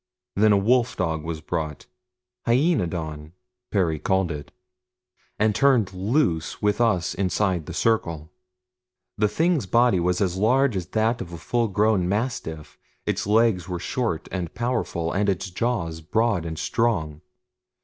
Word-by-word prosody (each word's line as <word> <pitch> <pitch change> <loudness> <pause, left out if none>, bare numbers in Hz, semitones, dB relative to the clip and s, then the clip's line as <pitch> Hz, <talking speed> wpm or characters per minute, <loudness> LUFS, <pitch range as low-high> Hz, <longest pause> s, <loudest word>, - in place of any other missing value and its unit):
Then 105 +2 +4
a 100 - +5
wolf 120 +4 +2
dog 80 -4 -1
was 80 -1 -5
brought 75 -1 -4 0.6
HYAENODON 85 - 0 0.4
Perry 85 -6 +1
called 95 0 +1
it 75 -1 -7 0.9
and 110 0 +2
turned 125 -7 +3
loose 95 - 0
with 105 +2 +1
us 95 -8 +2
inside 95 -3 0
the - - -6
circle. 85 -8 0 0.9
The 105 - +4
thing's 160 - +1
body 120 -1 +4
was 90 +1 +1
as 95 -2 0
large 125 +4 +3
as 90 -2 -3
that 110 +4 0
of 85 - -7
a - - -5
full 120 +8 0
grown 105 -2 +2
mastiff, 100 - -3 0.3
its - - -1
legs 105 -5 +2
were 90 - -2
short 90 -2 -2
and 90 -4 -4
powerful, 120 -9 -1
and 100 +1 +1
its 95 0 -2
jaws 85 -7 -2
broad 100 0 0
and 80 -1 -5
strong. 80 -10 -1
95 Hz, 145 wpm, -24 LUFS, 85-115 Hz, 0.9 s, a